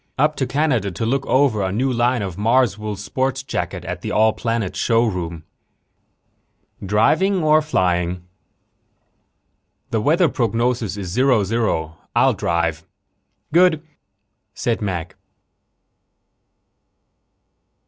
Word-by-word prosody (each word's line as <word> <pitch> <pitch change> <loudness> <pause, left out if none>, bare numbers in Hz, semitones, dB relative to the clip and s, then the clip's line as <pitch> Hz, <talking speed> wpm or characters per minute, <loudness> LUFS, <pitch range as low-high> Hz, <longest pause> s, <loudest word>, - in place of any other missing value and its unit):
Up 150 +3 +2
to 130 - -1
Canada 130 -6 0
to 95 +5 -4
look 135 +4 -1
over 130 -6 +2
a 95 -1 -1
new 130 +6 0
line 120 -1 +1
of 95 -3 -5
Marswool 110 -1 +1
sport 130 +6 -2
jackets - - -4
at - - -5
the - - -4
All 110 0 +3
Planets 115 -5 -2
Showroom." 90 -9 0 1.4
"Driving 160 - +2
or 155 0 +5
flying?" 90 - 0 1.7
"The 110 - 0
weather 165 +8 +3
prognosis 115 -4 -1
is 95 -3 -5
zero 125 +2 +3
zero. 95 -7 -1 0.2
I'll - - +4
drive." 85 -1 -1 0.7
"Good," 170 -2 +4 0.7
said 115 +2 -1
Mac. 90 -2 -4
115 Hz, 105 wpm, -20 LUFS, 95-130 Hz, 1.7 s, or